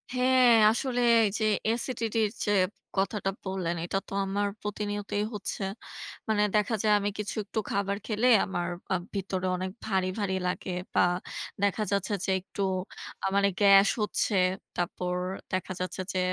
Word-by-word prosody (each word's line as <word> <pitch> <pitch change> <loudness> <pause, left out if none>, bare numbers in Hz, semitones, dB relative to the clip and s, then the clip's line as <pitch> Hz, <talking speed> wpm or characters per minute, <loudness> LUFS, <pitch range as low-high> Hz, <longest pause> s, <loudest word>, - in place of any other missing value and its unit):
হ্যাঁ, 255 0 +5 0.2
আসলে 245 +1 -1 0.2
এই - - +2
যে 220 - 0 0.3
acidity 230 -2 -2
এর 210 - -2
যে 205 - +1 0.5
কথাটা 195 0 0
বললেন 185 -3 -2
এটা 185 - -1
তো - - -9
আমার 200 +1 0
প্রতিনিয়তই 205 0 -2
হচ্ছে। 205 0 -4 0.7
মানে 210 -1 +3
দেখা 210 +2 +2
যায় 215 -1 +4
আমি 205 - -1
কিছু 210 - -3
একটু 215 - -3
খাবার 200 0 0
খেলে 220 +2 +1 0.2
আমার 175 -3 -2 0.3
আ - - +3 0.2
ভিতরে 190 -1 -2
অনেক 185 +1 -3
ভারী, 190 -3 +1
ভারী 195 -2 0
লাগে 180 +1 -3 0.2
বা - - +4 0.6
দেখা 200 +2 +2
যাচ্ছে 200 +2 0
যে 190 - 0
একটু 200 +1 -7 0.6
আ - - 0
মানে 200 0 +4
গ্যাস 195 0 +7
হচ্ছে। 210 0 0 0.4
তারপর 180 +1 -2 0.4
দেখা 185 0 -1
যাচ্ছে 185 +1 -3
যে 185 - 0
200 Hz, 155 wpm, -28 LUFS, 190-210 Hz, 0.7 s, গ্যাস